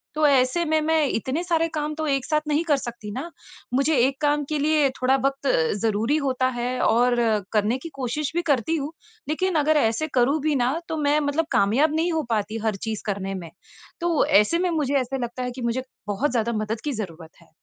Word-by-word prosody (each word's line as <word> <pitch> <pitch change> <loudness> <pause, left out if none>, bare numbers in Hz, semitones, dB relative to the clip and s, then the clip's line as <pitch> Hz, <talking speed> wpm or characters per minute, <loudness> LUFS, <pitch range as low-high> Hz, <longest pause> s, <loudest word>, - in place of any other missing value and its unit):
तो 305 0 +2
ऐसे 270 +4 +3
में 315 0 +2
मैं 315 -1 +2
इतने 260 +6 -2
सारे 330 -2 +1
काम 300 0 -2
तो 315 0 -3
एक 275 -2 0
साथ 305 -1 +1
नहीं 300 +2 +1
कर 295 -4 +3
सकती 235 -5 -7
न 265 - -3 0.5
मुझे 275 +4 +2
एक 265 +3 +2
काम 295 0 +2
के 305 - -1
लिए 300 -1 +3
थोड़ा 255 +1 +4
वक़्त 275 0 -1 0.3
ज़रूरी 225 +6 +1
होता 255 -1 +1
है 250 +1 -2
और 245 +2 +3 0.4
करने 215 +3 +2
की 300 +6 -8
कोशिश 275 +3 -2
भी 345 - +2
करती 280 +5 +1
हूँ 290 0 -4 0.4
लेकिन 365 +3 0
अगर 310 0 +4
ऐसे 230 +4 +1
करूँ 265 +5 +3
भी 305 0 +1
न 245 +2 +2 0.2
तो 320 - -2
मैं 290 +1 +3
मतलब 300 +2 0
कामयाब 270 +10 +3
नहीं 335 +2 +1
हो 320 -1 0
पाती 215 -1 -1
हर 215 -2 +1
चीज़ 220 -2 -3
करने 195 -1 -2
में। 165 - -9 0.5
तो 340 -2 +2
ऐसे 210 +12 +4
में 365 0 +1
मुझे 300 -5 0
ऐसे 255 +2 -3
लगता 240 +1 -4
है 250 - -3
कि 255 - -7
मुझे 235 +2 -1 0.2
बहुत 230 +8 0
ज़्यादा 235 -1 0
मदद 215 +1 -3
की 295 - 0
ज़रूरत 165 -4 -8
है। 170 - -21
275 Hz, 215 wpm, -24 LUFS, 235-305 Hz, 0.5 s, थोड़ा